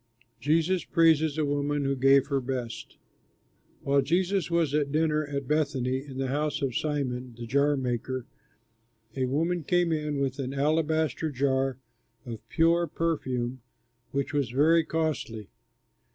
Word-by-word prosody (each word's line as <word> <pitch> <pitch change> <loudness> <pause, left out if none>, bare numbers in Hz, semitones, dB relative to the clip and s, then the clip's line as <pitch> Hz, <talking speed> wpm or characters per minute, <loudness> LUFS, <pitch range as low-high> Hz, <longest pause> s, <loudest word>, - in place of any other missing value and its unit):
JESUS 160 +6 +1
PRAISES 160 -2 +3
A 155 - +1
WOMAN 145 0 0
WHO 135 0 +1
GAVE 135 +1 +5
HER 140 -1 -1
BEST 125 -3 -5 0.9
While 140 0 +3
Jesus 180 +5 0
was 170 -4 +1
at 145 -2 +1
dinner 155 0 +1
at 140 -2 -4
Bethany 135 -3 0
in 135 -2 -9
the 135 -1 -1
house 150 +2 -1
of 130 -3 -1
Simon, 130 -5 -2
the 120 - -6
jar 140 +4 +2
maker, 130 0 -2 0.9
a 130 -1 0
woman 165 +6 0
came 175 +2 +2
in 150 -2 -1
with 135 0 -1
an 135 0 -3
alabaster 155 +1 +1
jar 135 -1 0 0.5
of 115 -3 -6
pure 170 +1 +3
perfume, 130 -7 -2 0.5
which 140 +3 -2
was 140 -5 0
very 160 +6 +4
costly. 150 -11 -3
140 Hz, 140 wpm, -28 LUFS, 130-155 Hz, 0.9 s, GAVE